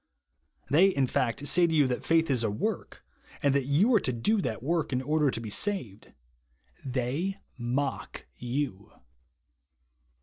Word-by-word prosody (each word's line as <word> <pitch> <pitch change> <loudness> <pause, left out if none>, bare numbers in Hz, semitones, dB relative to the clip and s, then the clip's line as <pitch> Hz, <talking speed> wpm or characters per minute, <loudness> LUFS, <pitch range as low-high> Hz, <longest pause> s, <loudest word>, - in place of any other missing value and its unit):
They 170 +7 +6
in 140 -9 +1
fact 125 +2 -1
say 170 +4 +4
to 165 - -1
you 150 -2 +5
that 125 -1 -2
faith 165 -2 +2
is 125 -3 +2
a 110 - +1
work, 105 - -4 0.4
and 140 -1 +3
that 140 -2 +1
you 165 - +3
are 220 - +6
to 130 - -2
do 200 - +1
that 110 - -4
work 165 +1 -1
in 125 - 0
order 150 +2 +1
to 120 - -3
be 110 -2 -7
saved. 125 - -1 0.7
They 135 +9 -2 0.2
mock 130 +4 -3
you. 120 -5 -4
140 Hz, 160 wpm, -28 LUFS, 125-165 Hz, 0.7 s, They